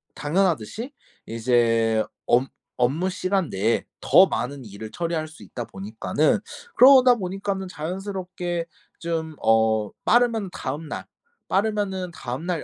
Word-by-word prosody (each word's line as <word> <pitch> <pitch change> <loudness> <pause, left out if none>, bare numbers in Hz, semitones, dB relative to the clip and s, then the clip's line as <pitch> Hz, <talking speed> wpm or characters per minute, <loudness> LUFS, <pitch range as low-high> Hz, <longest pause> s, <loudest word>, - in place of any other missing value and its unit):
당연하듯이 185 - -1 0.3
이제 115 -1 +2 0.2
업 125 +2 +4 0.3
업무 145 +10 +1
시간 185 -1 -1
내에 105 +4 0 0.2
더 190 - +6
많은 130 0 -4
일을 105 +1 -9
처리할 165 -2 -2
수 155 - -15
있다 120 -2 -6
보니까는 110 - 0 0.4
그러다 255 -1 +8
보니까는 195 -1 -3
자연스럽게 180 0 -4 0.3
좀 160 -2 -3
어 110 -1 +3
빠르면 230 -5 +3
다음날, 150 +4 -5 0.4
빠르면은 195 -3 0
다음날 155 +6 -4
165 Hz, 265 characters per minute, -24 LUFS, 120-190 Hz, 0.4 s, 그러다